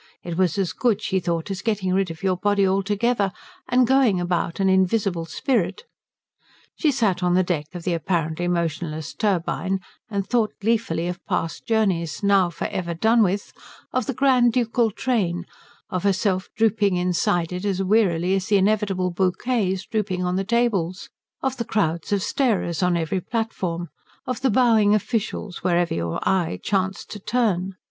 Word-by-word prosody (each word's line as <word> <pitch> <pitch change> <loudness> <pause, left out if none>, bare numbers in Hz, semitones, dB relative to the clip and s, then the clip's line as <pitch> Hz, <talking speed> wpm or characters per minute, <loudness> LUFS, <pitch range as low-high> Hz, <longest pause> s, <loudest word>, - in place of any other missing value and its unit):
It 170 -1 -4
was 185 -1 +1
as 195 -3 0
good, 230 -5 +1
she 190 -3 0
thought, 170 +1 -2
as 195 - -4
getting 205 -5 0
rid 190 -1 +1
of 165 +2 -9
your 190 -1 +2
body 200 +1 +2
altogether 200 +2 +1 0.4
and 250 0 +4
going 250 -7 +3
about 175 -1 -1
an 195 - +2
invisible 190 -2 +2
spirit. 225 - -1 0.9
She 310 - +2
sat 210 -8 +1
on 180 0 +2
the 185 - +4
deck 160 -5 -2
of 175 - -6
the 180 - 0
apparently 165 0 -1
motionless 160 -3 -2
turbine 190 -1 0 0.3
and 200 -2 -2
thought 230 -2 +1
gleefully 210 -6 0
of 180 0 -5
past 165 - -2
journeys, 190 -8 0
now 200 -3 +4
for - - -5
ever 170 -2 -3
done 225 +6 +3
with; 200 0 0 0.4
of 255 -3 0
the 270 - -2
grand 255 -3 +4
ducal 235 -1 +2
train, 195 -7 -1 0.5
of 185 - -1
herself 190 -1 0
drooping 210 -3 +2
inside 175 -1 0
it 180 +1 -4
as 195 -2 0
wearily 185 -3 +2
as 195 0 0
the 210 -2 +4
inevitable 195 -2 +1
bouquets 190 +2 0
drooping 190 -4 -2
on 180 0 0
the 195 - 0
tables, 200 -5 0 0.3
of 265 0 -1
the 235 - -1
crowds 170 -7 -1
of 200 -2 +1
starers 205 - 0
on 180 -1 +2
every 170 +3 -1
platform, 185 -6 -3 0.4
of 255 0 -3
the 265 - +2
bowing 220 -3 +4
officials 215 -3 -2
wherever 175 -1 +2
your 85 0 -2
eye 175 - +1
chanced 190 -1 -1
to 210 - -6
turn. 195 -5 0
190 Hz, 170 wpm, -23 LUFS, 175-220 Hz, 0.9 s, and